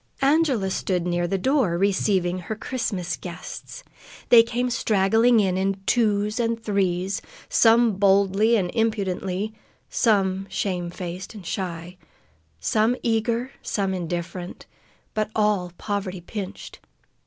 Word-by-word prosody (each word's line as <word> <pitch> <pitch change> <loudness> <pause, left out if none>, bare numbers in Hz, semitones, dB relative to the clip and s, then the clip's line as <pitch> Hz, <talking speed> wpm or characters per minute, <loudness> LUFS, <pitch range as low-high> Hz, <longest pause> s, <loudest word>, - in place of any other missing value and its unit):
Angela 275 -9 +2
stood 180 -2 -1
near 175 0 0
the 195 - 0
door, 235 - +1
receiving 190 -2 +1
her 200 +5 -5
Christmas 200 -7 -3
guests. 180 - -8 0.5
They 235 -2 +9
came 245 +2 -1
straggling 225 +2 +3
in, 190 -3 +1
in 195 +1 0
twos 210 -1 +1
and 230 -1 0
threes, 190 -3 -1 0.3
some 230 -2 +4
boldly 200 +3 +4
and 180 -5 0
impudently, 205 -2 -1 0.4
some 195 -3 +2
shame 180 -3 -2
faced 180 +3 -7
and 200 -4 -10
shy, 175 -1 -4 0.6
some 220 - +2
eager, 235 +2 0
some 195 -2 -1
indifferent, 175 0 -5 0.5
but 215 -1 -1
all 210 -4 +1
poverty 195 -3 -3
pinched. 195 +2 -7
200 Hz, 120 wpm, -24 LUFS, 185-225 Hz, 0.6 s, They